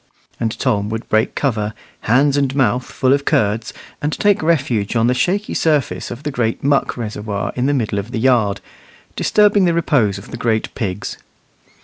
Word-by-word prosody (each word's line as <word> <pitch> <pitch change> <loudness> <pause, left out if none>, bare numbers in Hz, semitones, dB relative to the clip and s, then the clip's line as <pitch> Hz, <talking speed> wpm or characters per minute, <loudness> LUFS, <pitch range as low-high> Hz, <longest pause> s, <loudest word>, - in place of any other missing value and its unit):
and 115 -2 -2
Tom 105 -6 0
would 115 +1 -4
break 110 +2 +1
cover, 110 -6 -1 0.3
hands 135 +4 +4
and 140 -2 0
mouth 125 -2 +2
full 130 +1 +1
of 140 0 +1
curds, 110 -7 0 0.3
and 150 - -1
take 205 -2 +2
refuge 125 -10 0
on 115 0 +3
the 125 - +3
shaky 195 +10 0
surface 150 -4 0
of 120 +4 -8
the 150 - -2
great 115 -3 -1
muck 140 -1 +1
reservoir 105 -3 -4
in 125 +1 0
the 145 - +2
middle 110 -5 -1
of 100 +3 -6
the 120 - -4
yard, 115 -5 +2 0.5
disturbing 205 -2 +3
the 170 -1 +2
repose 130 -12 +2
of 100 - -11
the - - -5
great 115 -2 -1
pigs. 100 -3 -4
125 Hz, 180 wpm, -18 LUFS, 110-145 Hz, 0.5 s, hands